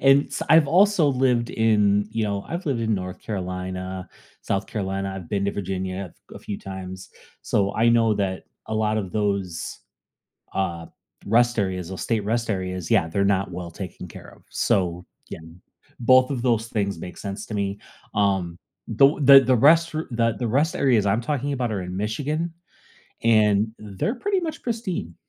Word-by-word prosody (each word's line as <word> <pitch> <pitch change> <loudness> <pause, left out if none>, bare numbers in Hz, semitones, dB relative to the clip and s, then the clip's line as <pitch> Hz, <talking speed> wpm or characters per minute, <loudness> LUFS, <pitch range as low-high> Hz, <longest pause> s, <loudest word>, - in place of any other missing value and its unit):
And 135 +1 +5
s - - -4
I've 160 -1 +6
also 185 -1 +4
lived 125 -3 +1
in, 105 -2 +2
you 110 0 -1
know 100 -1 -2
I've 170 +2 -5
lived 135 -5 0
in 110 -1 +1
North 90 -2 -5
Carolina, 95 -1 -5 0.3
South 100 +1 -1
Carolina, 95 -2 -3
I've 90 -4 -8
been 100 -1 -1
to 100 - 0
Virginia 95 -1 -4 0.2
a - - -9
f - - -12
few 100 - -5
times, 95 -1 -8 0.3
so 100 -1 0
I 115 +2 +3
know 115 -2 +4
that 95 -2 -2 0.2
a 110 - -4
lot 110 0 +1
of 95 -4 -5
those 100 -5 -2 0.7
uh, 85 -4 -2 0.4
rest 120 +3 +3
areas 95 -3 -2
or 95 - -6
state 110 -3 -1
rest 115 +2 -1
areas, 95 -3 -3
yeah, 95 -8 +3
they're 100 +4 0
not 100 -1 +1
well 85 -1 -6
taken 90 0 -8
care - - -12
of. - - -24
So, 90 -1 0 0.2
yeah, - - -7 0.6
both 130 +2 +5
of 135 -4 -2
those 115 -2 +1
things 100 -6 -2
make 90 0 -8
sense 100 0 -5
to 110 - -6
me. 100 0 -2 0.4
Um, 95 -4 0 0.4
th 135 +1 +7 0.3
the 130 -1 +4
rest 165 +7 +5
the 120 -7 -1
the 120 - -1
rest 145 +8 +1
areas 120 -7 +3
I'm 110 +4 +2
talking 145 +2 -2
about 125 -4 -2
are 100 -3 -2
in 90 0 -6
Michigan, 150 - -2 0.7
and 105 -2 +4
they're 105 - -3
pretty 390 +9 0
much 320 -2 -5
pristine. 195 - -3
105 Hz, 175 wpm, -24 LUFS, 95-120 Hz, 0.7 s, th